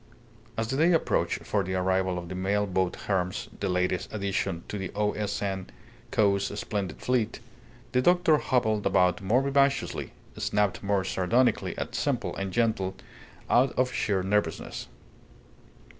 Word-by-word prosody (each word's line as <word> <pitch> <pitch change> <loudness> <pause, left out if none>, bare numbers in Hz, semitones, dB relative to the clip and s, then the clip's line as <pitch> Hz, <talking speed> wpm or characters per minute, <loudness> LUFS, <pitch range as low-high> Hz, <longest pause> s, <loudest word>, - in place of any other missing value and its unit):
As 115 0 0
the 135 - -1
day 165 +4 +4
approached 165 - +1
for 100 -2 +1
the 95 0 -3
arrival 95 0 +1
of 85 -1 -5
the 95 - -6
mail 100 +3 0
boat 95 -2 0
Hermes 90 -2 -1
(the - - -1
latest 90 0 0
addition 100 -4 -2
to 105 - -4
the 95 - -4
O. 105 0 +1
S. 105 -1 -2
N. 95 -2 -3 0.4
Co.'s 100 -1 +1
splendid 95 -6 -3
fleet), 125 -4 0 0.5
the 125 - +3
doctor 175 0 +4
hobbled 110 -6 +1
about 90 -1 +3
more 115 +7 +2
vivaciously, 140 0 +1 0.2
snapped 105 -2 0
more 100 -1 +1
sardonically 110 +6 +1
at - - -4
simple - - -1
and 95 -1 -3
gentle 105 -4 0 0.5
out 125 +2 +4
of 130 0 +1
sheer 95 -3 0
nervousness. 95 -4 -1
100 Hz, 150 wpm, -28 LUFS, 95-115 Hz, 0.5 s, day